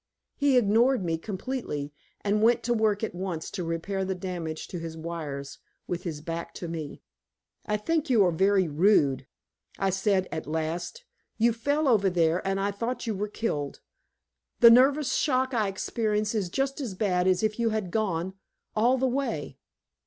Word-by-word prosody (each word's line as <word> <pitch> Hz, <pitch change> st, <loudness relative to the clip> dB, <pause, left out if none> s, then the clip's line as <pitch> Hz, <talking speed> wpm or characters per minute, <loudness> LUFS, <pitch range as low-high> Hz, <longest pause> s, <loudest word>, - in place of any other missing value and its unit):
He 285 Hz, -3 st, +3 dB
ignored 230 Hz, 0 st, +3 dB
me 165 Hz, -1 st, 0 dB
completely, 185 Hz, -, -4 dB, 0.3 s
and 210 Hz, +1 st, +1 dB
went 230 Hz, +2 st, +4 dB
to 240 Hz, -, +1 dB
work 220 Hz, -2 st, +1 dB
at 220 Hz, -, -2 dB
once 175 Hz, -3 st, -4 dB
to 180 Hz, -, -4 dB
repair 165 Hz, +4 st, -2 dB
the 190 Hz, 0 st, -2 dB
damage 175 Hz, -4 st, -5 dB
to 175 Hz, -, -5 dB
his 165 Hz, -1 st, -6 dB
wires, 150 Hz, -4 st, -6 dB, 0.3 s
with 175 Hz, +1 st, -4 dB
his 155 Hz, -4 st, -4 dB
back 170 Hz, +1 st, -5 dB
to 175 Hz, -, -5 dB
me. 160 Hz, -3 st, -6 dB, 0.6 s
"I 210 Hz, -, +1 dB
think 315 Hz, +8 st, -1 dB
you 225 Hz, -6 st, +5 dB
are 175 Hz, -, +3 dB
very 190 Hz, +2 st, +3 dB
rude," 145 Hz, -5 st, +3 dB, 0.5 s
I 195 Hz, -1 st, +1 dB
said 195 Hz, 0 st, +1 dB
at 160 Hz, -2 st, -4 dB
last. 160 Hz, -, -3 dB, 0.3 s
"You 230 Hz, +1 st, +3 dB
fell 285 Hz, +6 st, 0 dB
over 210 Hz, -6 st, +4 dB
there 170 Hz, -1 st, +2 dB
and 195 Hz, 0 st, 0 dB
I 200 Hz, +1 st, 0 dB
thought 230 Hz, +6 st, -3 dB
you 225 Hz, -, -1 dB
were 205 Hz, +1 st, -2 dB
killed. 150 Hz, -10 st, -3 dB, 0.8 s
The 235 Hz, -, +9 dB
nervous 270 Hz, +4 st, +5 dB
shock 260 Hz, -2 st, +1 dB
I 220 Hz, -4 st, +1 dB
experienced 210 Hz, +2 st, -1 dB
is 205 Hz, -5 st, -1 dB
just 270 Hz, -, -1 dB
as 225 Hz, -8 st, -4 dB
bad 185 Hz, -2 st, +1 dB
as 185 Hz, +2 st, +2 dB
if 215 Hz, +1 st, 0 dB
you 230 Hz, -1 st, +2 dB
had 215 Hz, -5 st, -2 dB
gone 190 Hz, -4 st, -1 dB, 0.4 s
all 240 Hz, +4 st, +3 dB
the 260 Hz, -, +1 dB
way." 275 Hz, +2 st, -3 dB
195 Hz, 175 wpm, -27 LUFS, 170-230 Hz, 0.8 s, The